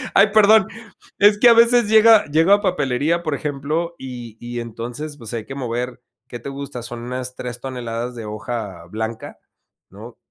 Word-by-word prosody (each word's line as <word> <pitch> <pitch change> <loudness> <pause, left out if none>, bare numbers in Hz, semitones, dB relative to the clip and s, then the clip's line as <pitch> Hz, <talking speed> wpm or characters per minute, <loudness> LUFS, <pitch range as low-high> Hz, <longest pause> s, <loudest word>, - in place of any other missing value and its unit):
Ay, 200 - +7
perdón, 215 -1 +6 0.5
es 205 +1 +5
que 240 - +7
a - - +8
veces 235 0 +5
llega 220 0 +6
llega 165 +7 +4
papelería, 160 - 0
por 155 -3 -2
ejemplo, 150 +4 -3
y 120 -4 -9
y 120 0 -6
entonces, 120 +6 -6
pues 115 -3 -8
hay 115 -2 -4
que 135 - -8
mover, 125 -1 -4 0.3
¿qué 120 - -8
te 130 - -7
gusta?, 135 -3 -7
son 120 0 -7
unas 125 +1 -5
3 125 -1 -6
toneladas 120 -2 -5
de 115 -2 -7
hoja 105 -4 -6
blanca, 110 +4 -6 0.5
¿no?, 115 +5 -12
130 Hz, 170 wpm, -20 LUFS, 120-170 Hz, 0.5 s, a